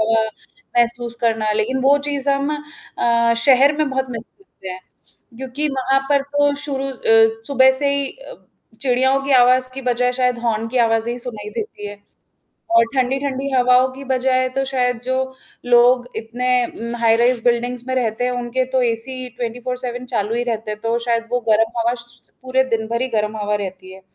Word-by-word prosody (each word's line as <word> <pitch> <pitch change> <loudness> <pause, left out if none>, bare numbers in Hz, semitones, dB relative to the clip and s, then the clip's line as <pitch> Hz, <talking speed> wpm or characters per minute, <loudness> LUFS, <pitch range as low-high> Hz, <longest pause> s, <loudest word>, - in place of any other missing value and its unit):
हवा 225 0 +3 0.6
महसूस 235 0 +1
करना 225 -2 +1
लेकिन 220 +5 0
वो 275 +2 +5
चीज़ 280 -1 -2
हम 275 +1 0 0.5
अ, 235 0 +3
शहर 275 +1 +6
में 305 -1 +1
बहुत 265 0 -1
मिस 235 -1 -6
करते 385 - -14
हैं 185 0 -6 0.6
क्योंकि 265 +4 -3
वहाँ 270 0 +1
पर 280 -1 +3
तो 290 +1 +1
शुरू 275 -2 -2
अ, - - -6 0.5
सुबह 265 -2 +5
से 280 0 +2
ही 280 -1 -1
अ, - - -12 0.5
चिड़ियाओं 265 +1 +2
की 275 - -3
आवाज़ 255 0 +5
की 270 - -6
बजाय 250 0 +1
शायद 250 -1 0
हॉर्न 225 -2 -1
की 255 - -5
आवाज़ें 225 +1 +1
ही 245 - -5
सुनाई 220 -4 -7
देती 210 -1 -6
है 205 0 -8 0.8
और 230 0 +6
ठंडी-ठंडी 270 +1 -1
हवाओं 250 0 +4
की 275 +1 -10
बजाय 255 -1 +1
तो 270 - +1
शायद 250 -3 -1
जो 260 +1 -1 0.5
लोग 245 +1 +5
इतने 230 +3 -4 0.2
उम, 235 +1 -6
हाइराइज़ 235 +1 +3
बिल्डिंग्स 245 0 0
में 260 - 0
रहते 240 -2 -1
हैं 250 - +1
उनके 245 +1 -1
तो 260 - +2
एसी 250 +2 -2
24/7 245 +1 -4
चालू 215 +1 0
ही 240 - 0
रहते 220 -2 -3
हैं 210 - -5
तो 230 +1 0
शायद 230 -1 0
वो 245 - +1
गर्म 225 +2 +2
हवा 235 +1 +1
स 240 0 -14
पूरे 260 +1 +1
दिन 220 -1 -2
भर 235 +1 -1
ही 260 - -1
गर्म 215 -2 -1
हवा 210 0 -1
रहती 190 -2 -5
है। 190 - -13
245 Hz, 185 wpm, -20 LUFS, 230-265 Hz, 0.8 s, शहर